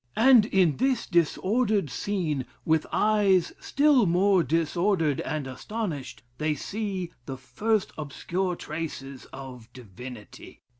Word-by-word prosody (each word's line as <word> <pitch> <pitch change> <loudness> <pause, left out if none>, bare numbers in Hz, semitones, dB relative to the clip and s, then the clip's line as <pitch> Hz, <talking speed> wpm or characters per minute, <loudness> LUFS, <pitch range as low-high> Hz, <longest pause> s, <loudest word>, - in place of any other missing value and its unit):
And 235 -2 +6
in 185 -8 +2
this 255 -1 +1
disordered 195 - +1
scene, 160 - -2 0.2
with 160 -1 +2
eyes 205 -4 +3
still 280 -6 +3
more 185 +2 +4
disordered 165 0 +1
and 155 -3 -3
astonished, 150 - -5 0.2
they 155 0 0
see 195 +1 -4 0.2
the 135 - -5
first 190 - -1
obscure 175 +5 -2
traces 145 -5 -6
of 125 -4 -10
divinity.... 120 -1 -11
170 Hz, 110 wpm, -26 LUFS, 140-205 Hz, 0.2 s, And